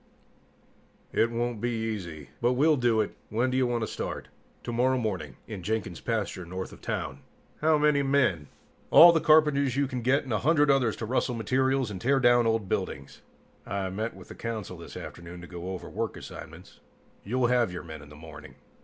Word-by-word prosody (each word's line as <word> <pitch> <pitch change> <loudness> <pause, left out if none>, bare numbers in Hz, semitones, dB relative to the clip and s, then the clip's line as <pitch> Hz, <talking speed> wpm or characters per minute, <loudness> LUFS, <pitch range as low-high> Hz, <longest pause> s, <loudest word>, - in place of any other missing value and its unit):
"It 115 - +3
won't 120 -1 -2
be 120 - 0
easy, 105 -9 -4
but 120 +1 +3
we'll 150 +5 +4
do 120 -4 +2
it. 105 - -4
When 120 +4 0
do - - -1
you 130 -1 +3
want 120 -1 -1
to 110 - -1
start?" - - -5 0.3
"Tomorrow 125 +2 +1
morning. 95 - -3
In 105 -4 -7
Jenkin's 100 -2 -3
pasture, 110 -5 -2
north 95 +2 -6
of - - -14
town." - - -3 0.4
"How 155 0 +4
many 150 -1 +3
men?" 130 - +1 0.4
"All 170 +1 +10
the 165 -1 +2
carpenters 150 -4 +4
you 140 - +3
can 130 -2 -4
get 130 +4 +2
and 130 -4 -4
a 105 - +1
hundred 150 -1 +4
others 130 -5 +2
to 110 - -5
rustle 125 +1 0
materials 130 +1 +1
and 95 -3 -6
tear 135 +2 +3
down 120 -2 +5
old 110 -3 0
buildings." 70 -6 -4 0.4
"I 95 +1 -3
meet 110 +4 -3
with - - -13
the - - -7
Council 115 -4 -5
this - - -10
afternoon 85 +1 -9
to - - -9
go 90 +1 -7
over 95 -1 -6
work 115 +1 -3
assignments. - - -11 0.4
You'll 125 +4 0
have 120 -4 +2
your 90 - -6
men 80 -3 -9
in 75 - -13
the 75 - -13
morning." 80 0 -12
115 Hz, 195 wpm, -28 LUFS, 95-130 Hz, 0.4 s, All